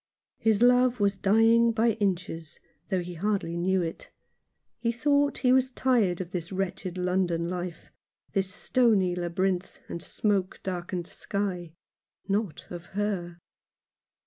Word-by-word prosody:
His 220 0 +3
love 250 0 +4
was 200 -1 +2
dying 225 +4 +4
by 230 +1 +3
inches, 185 -6 -3 0.3
though 190 -3 +1
he 175 0 -7
hardly 190 -1 -1
knew 185 +1 +1
it. 165 - -6 0.7
He 235 - +1
thought 285 +3 +2
he 250 - +6
was 260 0 +3
tired 240 -9 +2
of 180 -2 -5
this 170 -2 -4
wretched 185 -1 -3
London 180 -2 0
life 175 -1 -5 0.2
— - - -43
this 190 -1 0
stony 210 -7 +2
labyrinth, 180 +1 -1
and 170 - -6
smoke 195 0 -1
darkened 180 -1 -3
sky 180 -3 -3 0.3
— - - -67 0.3
not 200 -5 -1
of 175 -1 -7
her. 185 -5 -2
190 Hz, 140 wpm, -28 LUFS, 175-225 Hz, 0.7 s, he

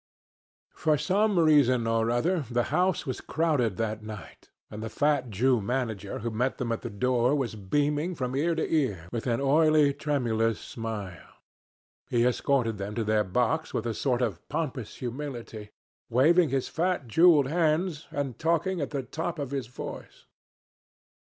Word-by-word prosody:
For 155 -1 +1
some 200 +4 +1
reason 145 -7 +4
or 115 0 +1
other, 160 +8 +1
the 120 -1 +1
house 180 +2 +1
was 130 - -4
crowded 145 - 0
that 110 -1 -2
night, 105 -5 -10 0.2
and 105 - -7
the 110 - -4
fat 145 -1 +1
Jew 120 +3 +2
manager 110 -4 -3
who 115 - -1
met 125 +4 -1
them 120 -2 -2
at 115 - -2
the - - -5
door 125 +4 +1
was 135 -6 -1
beaming 145 - -1
from 130 -2 -3
ear 165 +4 +1
to 160 - -1
ear 105 - 0
with 115 +2 -4
an 115 -1 +1
oily 150 +1 +4
tremulous 115 -7 0
smile. 105 -7 -7 0.7
He 120 -1 +2
escorted 125 -3 +1
them 100 +2 -5
to 115 - 0
their 110 0 +2
box 125 - -1
with 115 - -1
a 115 - -1
sort 125 +1 0
of 100 -8 -2
pompous 145 -7 -3
humility, 120 -4 -6 0.4
waving 160 +7 +4
his 135 -2 -1
fat 175 -3 -1
jewelled 155 +2 +5
hands 165 0 0
and 140 -4 -4
talking 170 +2 0
at 140 - -2
the 140 -2 -3
top 165 +7 -4
of 140 -3 -4
his 135 -4 -3
voice. 125 - -9
130 Hz, 165 wpm, -27 LUFS, 115-155 Hz, 0.7 s, jewelled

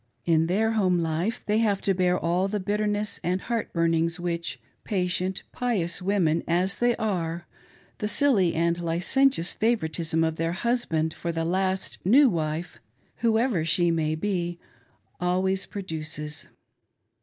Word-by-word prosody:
In 165 -1 +3
their 215 +5 +1
home 190 -5 +2
life 170 +6 -1
they 210 +1 +2
have 205 -4 +2
to 195 - +2
bear 180 -1 +2
all 175 +3 +1
the 210 +1 -2
bitterness 210 +1 -1
and 180 +2 0
heartburnings 165 -7 0
which, 170 -7 -3 0.2
patient, 185 -1 -1
pious 200 -8 -1
women 180 -4 +1
as 180 +3 +1
they 240 0 +3
are, 175 -5 -2 0.5
the 210 - -1
silly 215 - +3
and 170 +1 +1
licentious 175 +6 +2
favoritism 165 -7 0
of 160 0 -1
their 165 +1 -1
"husband" 175 -8 0
for 170 - -4
the 165 0 -2
last 190 +2 -1
new 265 +10 +6
wife, 160 - -3 0.4
whoever 225 -5 +1
she 170 +1 +2
may 155 -1 0
be, 175 -1 -2 0.6
always 185 +2 0
produces. 155 -5 -5
180 Hz, 135 wpm, -26 LUFS, 165-205 Hz, 0.6 s, new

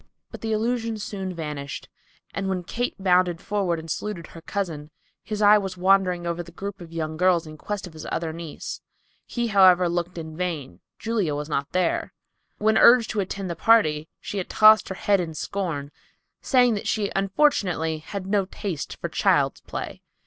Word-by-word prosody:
But - - -9
the 225 - -2
illusion 225 +1 0
soon 195 -2 -5
vanished, 150 -4 -6 0.5
and 195 -1 -2
when 185 -2 -2
Kate 245 +7 -3
bounded 180 -3 +2
forward 195 -5 -1
and 160 0 -8
saluted 175 0 -4
her 165 - -12
cousin, 165 -6 -4 0.3
his 215 -1 -2
eye 210 +1 +7
was 190 -2 -5
wandering 185 -1 +3
over 170 0 -2
the 170 0 -11
group 195 +1 -7
of 165 -1 -10
young 160 -1 -3
girls 180 -1 +3
in 155 0 -9
quest 205 +5 -5
of 180 - -11
his 155 -1 -8
other 165 -1 -2
niece. 165 -2 -7 0.5
He, 240 -1 -2
however, 185 -3 +6
looked 175 +1 -2
in 160 -1 -6
vain. 155 - -4 0.2
Julia 210 -10 -1
was 150 +1 -4
not 140 -2 -1
there. 185 -2 0 0.4
When 220 +1 +3
urged 235 -1 +6
to 215 - -2
attend 195 0 -3
the - - -4
party, 160 -7 +3
she 205 - -4
had 185 - -5
tossed 215 0 +6
her 190 - -4
head 200 +1 +2
in 165 -3 -4
scorn 155 -6 -3 0.5
saying 250 -3 +4
that 205 - -3
she 205 -2 0
unfortunately 195 - +1
had 185 +4 -6
no 200 0 +1
taste 185 -5 -5
for - - -3
child's - - +2
play. - - -6
185 Hz, 185 wpm, -24 LUFS, 165-205 Hz, 0.5 s, eye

